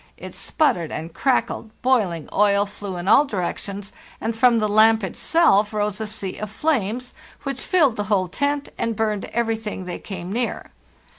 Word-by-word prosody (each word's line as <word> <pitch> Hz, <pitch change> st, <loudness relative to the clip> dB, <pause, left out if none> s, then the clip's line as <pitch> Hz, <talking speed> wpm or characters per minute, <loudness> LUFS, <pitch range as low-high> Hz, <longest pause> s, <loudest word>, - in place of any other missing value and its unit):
It -, -, -9 dB
sputtered 180 Hz, -, 0 dB
and 160 Hz, +1 st, -5 dB
crackled, 255 Hz, -4 st, 0 dB
boiling 205 Hz, -, +1 dB
oil 200 Hz, 0 st, +4 dB
flew 200 Hz, -2 st, -7 dB
in 175 Hz, +1 st, -5 dB
all 280 Hz, -, +7 dB
direc 195 Hz, -11 st, -3 dB
tions, 200 Hz, 0 st, -7 dB, 0.3 s
and 225 Hz, +1 st, -2 dB
from 235 Hz, +1 st, +5 dB
the 215 Hz, -1 st, +2 dB
lamp 220 Hz, +1 st, +5 dB
itself 210 Hz, -, +2 dB
rose 210 Hz, 0 st, -1 dB
a 220 Hz, -, -2 dB
sea 205 Hz, -3 st, -5 dB
of 215 Hz, -, -4 dB
flames 250 Hz, -2 st, -1 dB, 0.3 s
which 275 Hz, -2 st, -3 dB
filled 295 Hz, -11 st, +3 dB
the 205 Hz, -, -1 dB
whole 190 Hz, -2 st, +1 dB
tent 285 Hz, +9 st, -1 dB
and 230 Hz, -1 st, 0 dB
burned 215 Hz, -2 st, -1 dB
everything 225 Hz, -4 st, -2 dB
they 180 Hz, -, -5 dB
came 185 Hz, -1 st, -6 dB
near. 240 Hz, +1 st, -2 dB
215 Hz, 170 wpm, -22 LUFS, 195-240 Hz, 0.3 s, all